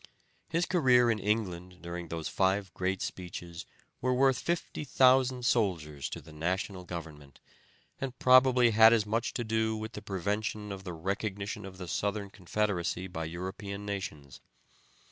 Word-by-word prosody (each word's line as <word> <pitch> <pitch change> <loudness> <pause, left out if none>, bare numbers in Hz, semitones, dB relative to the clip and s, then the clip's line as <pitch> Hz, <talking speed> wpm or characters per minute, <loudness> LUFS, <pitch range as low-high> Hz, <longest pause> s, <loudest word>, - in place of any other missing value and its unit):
His 165 +1 +1
career 125 -8 +4
in 110 - -1
England 90 -4 -2
during 85 0 -5
those 80 -1 -4
five 95 -1 +1
great 95 +1 -1
speeches 90 -1 -6 0.3
were 130 0 +2
worth 135 0 +4
50,000 130 -6 +2
soldiers 80 - 0
to - - -5
the 80 - -14
National 90 +3 -2
government, 75 -6 -8 0.6
and 130 -2 -4
probably 130 -2 +6
had 110 0 +7
much 115 +3 -1
to 120 - -1
do 110 0 0
with 110 +1 -5
the 105 - -7
prevention 105 +2 -2
of 95 0 -7
the 90 - -4
recognition 100 +3 -3
of 95 -1 -11
the 90 -1 -7
Southern 100 +2 -2
Confederacy 95 -2 -1
by 80 -3 -5
European 95 +4 -5
nations. 75 -10 -6
100 Hz, 145 wpm, -30 LUFS, 90-115 Hz, 0.6 s, had